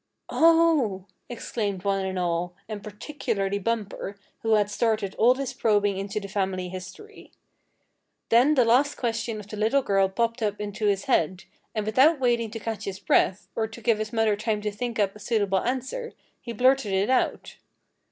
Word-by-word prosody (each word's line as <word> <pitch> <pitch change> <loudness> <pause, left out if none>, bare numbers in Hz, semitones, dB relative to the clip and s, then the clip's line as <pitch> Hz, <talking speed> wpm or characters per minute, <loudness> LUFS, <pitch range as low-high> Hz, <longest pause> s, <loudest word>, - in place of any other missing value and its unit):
"Oh!" 320 - +3 0.2
exclaimed 205 -5 -3
one 195 -1 0
and 190 0 -4
all, 175 0 -1
and 210 -2 -6
particularly 210 -3 -3
Bumper, 205 -2 -3 0.2
who 225 -1 +1
had 210 -1 +1
started 215 -2 0
all 245 +3 +6
this 270 -1 -4
probing 205 -2 +2
into 200 +2 -3
the 200 - -7
family 190 -2 -2
history. 185 - -10 1.0
Then 255 +7 +5
the 250 -4 +4
last 260 +5 +3
question 230 -2 -2
of 210 - -9
the 210 - -7
little 225 +6 +2
girl 195 -3 +2
popped 230 +4 -1
up 210 -1 -1
into 210 +1 -2
his 195 -1 +1
head, 185 - +1 0.3
and 215 -1 -1
without 265 +8 +4
waiting 240 -3 +1
to 225 +1 -6
catch 225 -1 -5
his 195 -1 -4
breath, 190 0 +2
or 220 -1 0
to 220 +1 -11
give 225 -1 +1
his 215 0 -3
mother 225 -2 +2
time 215 +1 -1
to 210 0 -2
think 235 +3 -4
up 200 -2 +1
a - - -12
suitable 205 -3 +1
answer, 265 - -3 0.3
he 235 - -6
blurted 250 -2 +2
it 195 +5 +1
out. 260 - 0
215 Hz, 180 wpm, -26 LUFS, 200-240 Hz, 1.0 s, all